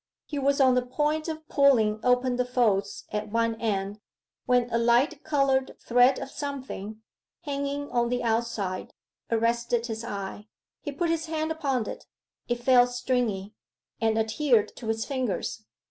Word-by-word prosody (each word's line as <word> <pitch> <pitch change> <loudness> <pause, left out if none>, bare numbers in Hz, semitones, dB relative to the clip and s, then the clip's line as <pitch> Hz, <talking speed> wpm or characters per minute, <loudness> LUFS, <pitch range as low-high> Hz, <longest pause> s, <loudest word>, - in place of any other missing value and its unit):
He 290 - -4
was 280 +1 +2
on 260 -2 +6
the 250 - +3
point 295 +5 -1
of 315 -1 -5
pulling 230 -7 +4
open 250 0 +2
the 250 - +2
folds 220 -6 0
at 210 0 -2
one 230 0 +1
end, 205 -2 -1 0.5
when 245 -1 +3
a 230 - +2
light 245 +6 +2
coloured 275 -3 +1
thread 245 +2 +4
of 270 0 -6
something, 255 -7 -6 0.4
hanging 285 -2 -3
on 240 -1 +1
the 245 0 -1
outside, 225 -5 -2 0.3
arrested 235 +1 +1
his 225 -1 -5
eye. 205 -1 -6 0.3
He 290 - -4
put 330 +4 -1
his 330 0 -1
hand 315 0 -2
upon 275 -8 -1
it; - - -7 0.4
it 240 0 -2
felt 250 -1 +6
stringy, 245 -5 -1 0.5
and 225 -1 +2
adhered 225 +1 +2
to 230 - -7
his 225 0 -1
fingers. 245 -5 -3
245 Hz, 155 wpm, -27 LUFS, 225-275 Hz, 0.5 s, on